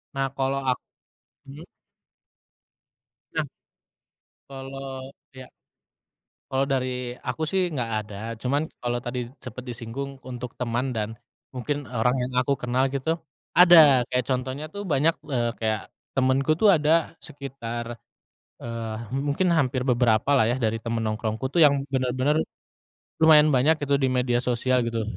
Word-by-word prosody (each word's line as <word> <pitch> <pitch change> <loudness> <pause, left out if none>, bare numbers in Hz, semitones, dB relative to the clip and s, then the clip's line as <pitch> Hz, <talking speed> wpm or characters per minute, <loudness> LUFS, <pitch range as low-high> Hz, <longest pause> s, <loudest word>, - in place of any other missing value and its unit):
Nah 135 0 0
kalau 135 0 0
ak 125 - +2 0.7
mmm? 145 +5 -11 1.7
Nah - - -1 1.0
Kalau 135 0 -7 0.4
ya. 130 -1 -10 1.0
Kalau 135 +1 +2
dari 125 -2 -2 0.2
aku 160 - -2
sih 190 - +2
nggak 125 -5 -2
ada, 105 -1 -11 0.3
cuman 140 +4 0 0.2
kalau 120 0 -1
tadi 125 +1 -3 0.2
sempat 125 0 -8
disinggung 125 +4 -6
untuk 125 -1 -6
teman 125 +1 -1
dan, 110 -4 -2 0.4
mungkin 145 +3 -3
orang 125 0 +1
yang 125 - -7
aku 140 +2 0
kenal 125 +2 0
gitu, 135 +2 -3 0.4
ada 175 -1 +8 0.3
kayak 125 -1 0
contohnya 130 +3 -2
tuh 200 - -5
banyak, 150 +4 +3 0.2
eee, 120 -4 +1
kayak 110 -2 0 0.4
temenku 135 +3 +2
tuh 205 +2 +6
ada 160 0 +2
sekitar, 120 -4 -6 0.7
eee, 115 -1 -5 0.3
mungkin 170 +5 +2
hampir 130 -4 +1
beberapa 120 -1 +2
lah 120 -5 +4
ya 125 - 0
dari 115 -2 -1
teman 115 -1 -2
nongkrongku 110 +3 -2
tuh 170 - +5
yang 145 -2 +7 0.2
benar-benar, 130 +4 +1 0.8
lumayan 155 -1 +7
banyak 145 +6 +4
gitu 140 -1 +2
di 135 - +3
media 125 -1 +2
sosial 125 +1 +1
gitu 115 -1 -1
130 Hz, 135 wpm, -25 LUFS, 120-140 Hz, 1.7 s, ada